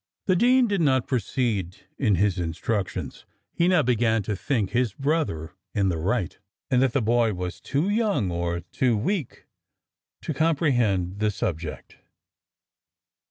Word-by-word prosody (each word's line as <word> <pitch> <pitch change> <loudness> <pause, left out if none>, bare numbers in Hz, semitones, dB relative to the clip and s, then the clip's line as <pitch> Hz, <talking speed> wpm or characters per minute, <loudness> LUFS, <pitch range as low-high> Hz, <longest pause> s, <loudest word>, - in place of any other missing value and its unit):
The 185 - +3
dean 250 +5 +4
did 200 -4 0
not 130 -5 +3
proceed 110 -7 -1 0.2
in 110 -8 +3
his 95 0 +1
instructions. 90 +4 -3 0.3
He 170 - +2
now 180 -4 +4
began 115 -3 +2
to 105 +1 -2
think 110 -1 -1
his 125 -4 +1
brother 135 - -1 0.2
in 100 -2 +2
the 85 -3 -1
right, 95 +2 -1 0.3
and 125 -1 +4
that 130 -2 +2
the 140 - +1
boy 115 -1 +2
was 90 0 -5
too 145 +6 -1
young, 205 - +1
or 85 0 -2
too 115 +6 0
weak, 160 - -3 0.8
to 155 - -2
comprehend 120 - +1
the 105 0 +2
subject. 85 -5 -4
115 Hz, 145 wpm, -25 LUFS, 95-145 Hz, 0.8 s, dean